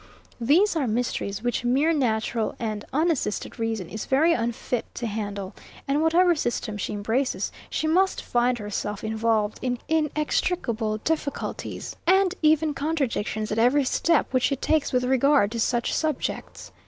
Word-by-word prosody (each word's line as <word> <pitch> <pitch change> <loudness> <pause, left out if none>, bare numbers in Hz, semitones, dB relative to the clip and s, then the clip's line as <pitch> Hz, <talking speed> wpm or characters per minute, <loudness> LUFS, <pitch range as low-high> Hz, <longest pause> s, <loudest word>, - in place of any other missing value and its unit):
These 325 - +3
are 290 -6 0
mysteries, 220 -3 -2
which 245 -1 -1
mere 275 +7 +3
natural 225 -5 0
and 215 -3 -3
unassisted 300 -9 -1
reason 225 -5 -2
is 220 - -6
very 315 +6 +4
unfit 235 0 -2
to 240 - -4
handle; 205 -3 -4 0.3
and 280 +2 +1
whatever 345 +2 +4
system 240 -7 -2
she 205 - -3
embraces, 225 +6 -1 0.2
she - - -2
must 370 +5 +2
find 245 0 +1
herself 210 -1 -4
involved 220 -1 0
in 250 -1 -1
inextricable 300 -7 0
difficulties, 305 -3 -3
and 380 0 +4
even 310 -1 +3
contradictions, 270 -8 -2
at 215 - 0
every 255 +5 +4
step 320 +4 +2
which 255 - +3
she 275 - +1
takes 310 +3 0
with 250 -1 +1
regard 265 -3 +3
to 230 - -3
such 240 +1 0
subjects. 310 -4 -3
250 Hz, 145 wpm, -25 LUFS, 220-305 Hz, 0.3 s, very